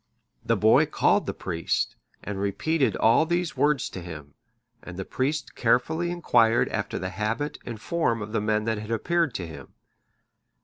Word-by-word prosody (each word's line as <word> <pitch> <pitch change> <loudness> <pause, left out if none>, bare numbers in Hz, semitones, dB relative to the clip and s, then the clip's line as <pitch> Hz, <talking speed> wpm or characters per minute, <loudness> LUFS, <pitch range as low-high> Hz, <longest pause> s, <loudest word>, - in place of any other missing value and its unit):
The - - +1
boy - - +5
called - - +2
the - - -1
priest, 85 -2 -2 0.3
and 100 -1 -4
repeated 140 +9 0
all 115 +8 +4
these 175 0 -1
words 145 -3 +2
to 90 - -6
him; 75 -5 -9 0.5
and 90 0 -9
the 95 - -4
priest 140 +1 -2
carefully 160 +9 +1
inquired 120 -9 +3
after - - -3
the 95 - -3
habit 110 +9 -2
and 115 -3 -5
form 140 -4 0
of 105 - -8
the 110 - 0
men 105 0 +1
that 110 -1 -1
had 105 +1 -8
appeared 160 +4 0
to 90 - -3
him. 70 -5 -11
115 Hz, 170 wpm, -26 LUFS, 100-150 Hz, 0.5 s, boy